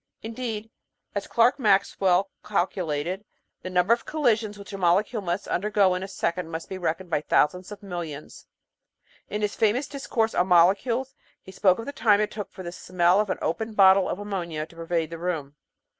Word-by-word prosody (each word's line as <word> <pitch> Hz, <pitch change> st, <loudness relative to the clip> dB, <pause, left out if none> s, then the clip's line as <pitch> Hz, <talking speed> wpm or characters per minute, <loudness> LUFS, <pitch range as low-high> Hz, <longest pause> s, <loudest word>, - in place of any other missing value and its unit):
In 225 Hz, +1 st, -6 dB
deed, 225 Hz, -2 st, -5 dB, 0.4 s
as 200 Hz, -1 st, -3 dB
Clerk 240 Hz, +4 st, +3 dB
Maxwell 195 Hz, -3 st, +2 dB
calculated, 180 Hz, -2 st, -2 dB, 0.4 s
the 185 Hz, -, -6 dB
number 180 Hz, +4 st, +3 dB
of 235 Hz, -, -2 dB
collisions 230 Hz, -8 st, 0 dB
which 200 Hz, 0 st, -11 dB
a -, -, -4 dB
molecule 195 Hz, +6 st, +2 dB
must 180 Hz, +1 st, -3 dB
undergo 200 Hz, -1 st, +2 dB
in 180 Hz, -, -2 dB
a 190 Hz, -, -4 dB
second 180 Hz, -3 st, -2 dB
must 165 Hz, 0 st, -6 dB
be 190 Hz, -, -5 dB
reckoned 175 Hz, +1 st, -3 dB
by 150 Hz, -, +1 dB
thou -, -, +6 dB
sands 180 Hz, +4 st, -12 dB
of 210 Hz, 0 st, -9 dB
millions. 170 Hz, -6 st, -7 dB, 0.8 s
In 210 Hz, 0 st, -3 dB
his 210 Hz, -, 0 dB
famous 225 Hz, +6 st, +1 dB
discourse 240 Hz, -5 st, -1 dB
on 180 Hz, -, +2 dB
molecules 200 Hz, +9 st, +3 dB, 0.3 s
he 190 Hz, -, -11 dB
spoke 190 Hz, -1 st, +3 dB
of 230 Hz, -, -6 dB
the 285 Hz, -, -4 dB
time 210 Hz, -7 st, +3 dB
it 210 Hz, -, 0 dB
took 205 Hz, -2 st, -6 dB
for 185 Hz, -, -9 dB
the 175 Hz, -, -5 dB
smell 180 Hz, +1 st, +2 dB
of 210 Hz, -1 st, 0 dB
an -, -, -1 dB
opened 220 Hz, +6 st, -2 dB
bottle 190 Hz, -1 st, +6 dB
of -, -, -2 dB
ammonia 175 Hz, -7 st, -4 dB
to 165 Hz, -, -19 dB
pervade 165 Hz, -1 st, -2 dB
the 165 Hz, -, -6 dB
room. 160 Hz, -5 st, -3 dB
190 Hz, 195 wpm, -25 LUFS, 175-210 Hz, 0.8 s, thou